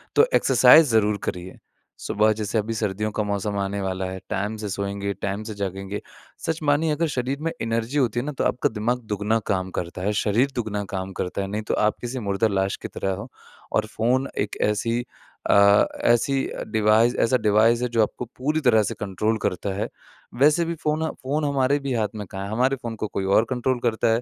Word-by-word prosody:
तो 450 - +6
एक्सरसाइज़ 160 0 +7
ज़रूर 105 -2 +3
करिए। 90 +1 -5 0.4
सुबह 110 +1 +2
जैसे 105 +1 -1
अभी 110 +2 -1
सर्दियों 105 0 -2
का 105 - -1
मौसम 100 0 -2
आने 100 +1 -2
वाला 95 0 -2
है, 95 0 -5
टाइम 105 +3 -2
से 105 - -3
सोएँगे, 100 0 -3
टाइम 100 +2 -4
से 110 - -6
जागेंगे, 95 +1 -4 0.5
सच 160 0 -1
मानिए 150 +2 +2
अगर 160 +2 +1
शरीर 130 +3 -1
में 165 +1 -1
एनर्जी 115 +4 -1
होती 120 -3 +1
है 125 - -3
ना, 150 - -2
तो 135 - -3
आपका 125 - +1
दिमाग 115 +3 -1
दुगना 105 +2 +1
काम 95 -1 -1
करता 85 +1 -6
है, 100 +3 0
शरीर 120 +6 +2
दुगना 105 -4 -2
काम 95 0 -4
करता 90 +2 -2
है, 95 - -3
नहीं 105 +2 -3
तो - - +2
आप 110 - 0
किसी 125 +1 -4
मुर्दा 100 +3 +2
लाश 95 -1 0
की - - -4
तरह 95 - -3
हो। 100 +5 -6 0.4
और 110 - +1
फ़ोन 125 +4 +2 0.2
एक - - -9
ऐसी 115 +3 -1 0.5
अ, 100 0 +6 0.2
ऐसी 120 +4 +3
अ, - - -6
डिवाइस 110 +2 +3
ऐसा 125 +2 +2
डिवाइस 110 +2 +3
है 125 - +1
जो 115 -1 +2
आपको 125 - -4
पूरी 150 +5 0
तरह 110 -5 +5
से - - -2
कंट्रोल 105 +3 -1
करता 100 +2 -2
है। 100 - -2 0.5
वैसे 155 +4 +5
भी 170 - -2
फ़ोन 155 +1 0 0.2
फ़ोन 145 +3 -1
हमारे 140 0 +2
भी 140 -2 -3
हाथ 110 -3 +1
में 105 -1 -5
कहाँ 95 0 -5
है, 100 - -6
हमारे 130 +4 +2
फ़ोन 115 -1 -4
को 110 - -3
कोई 100 -1 -3
और 115 - +5
कंट्रोल 130 0 0
करता 115 -1 +1
है, 115 - +1
110 Hz, 215 wpm, -24 LUFS, 100-125 Hz, 0.5 s, एक्सरसाइज़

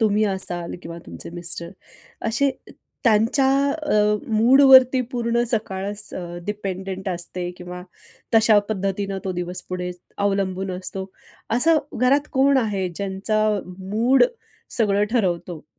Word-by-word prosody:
तुम्ही 215 -1 +3
असाल 180 -3 -3
किंवा 170 0 -8
तुमचे 85 - -9
मिस्टर, 170 0 -5 0.6
असे 275 +5 +2 0.5
त्यांच्या 230 +4 +3 0.3
अ, 210 -10 +1 0.2
मूडवरती 260 +2 +7
पूर्ण 235 -1 0
सकाळच 205 -2 0
अ, - - -5 0.2
डिपेंडेंट 195 -2 -4
असते? 175 0 -4
किंवा 180 0 -8 0.5
तशा 220 -1 +6
पद्धतीनं 195 -1 -2
तो 190 - -2
दिवस 180 0 -3
पुढे 180 0 -3 0.3
अवलंबून 195 -1 -1
असतो, 190 +1 -5 0.5
असं 320 +6 +4 0.2
घरात 280 +4 +3
कोण 275 +1 +4
आहे, 200 -6 -1
ज्यांचा 200 +4 -1 0.3
मूड 220 - +3 0.5
सगळं 205 -2 +3
ठरवतो? 175 -7 -1
200 Hz, 115 wpm, -22 LUFS, 185-230 Hz, 0.6 s, मूडवरती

